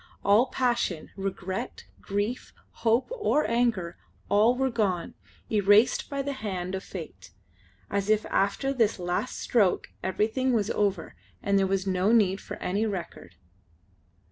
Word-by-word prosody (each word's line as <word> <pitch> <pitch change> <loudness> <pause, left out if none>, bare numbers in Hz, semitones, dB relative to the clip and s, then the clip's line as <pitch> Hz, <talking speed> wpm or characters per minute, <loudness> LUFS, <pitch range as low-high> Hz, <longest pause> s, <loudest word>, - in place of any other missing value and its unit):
All 210 +6 +5
passion, 240 -10 -1
regret, 195 -1 -4 0.2
grief, 205 +5 -3 0.3
hope, 230 +2 +2
or 425 -11 +1
anger 230 -8 0 0.3
all 220 +4 +4
were 265 0 0
gone, 200 -7 -1 0.4
erased 210 +3 +4
by 280 -1 -2
the 280 +1 -3
hand 190 -7 -4
of 190 0 -3
fate, - - -9 0.6
as 200 0 -2
if 215 0 +3
after 205 +8 +1
this 230 -5 +2
last 180 +7 -2
stroke 205 -7 +1
everything 220 +7 0
was 215 -2 +1
over 200 -5 -1 0.3
and 200 0 +3
there 195 - +2
was 195 0 0
no 190 +2 +1
need 200 -4 +3
for 205 - -7
any 205 +4 -1
record. 175 - -6
205 Hz, 140 wpm, -27 LUFS, 190-235 Hz, 0.6 s, All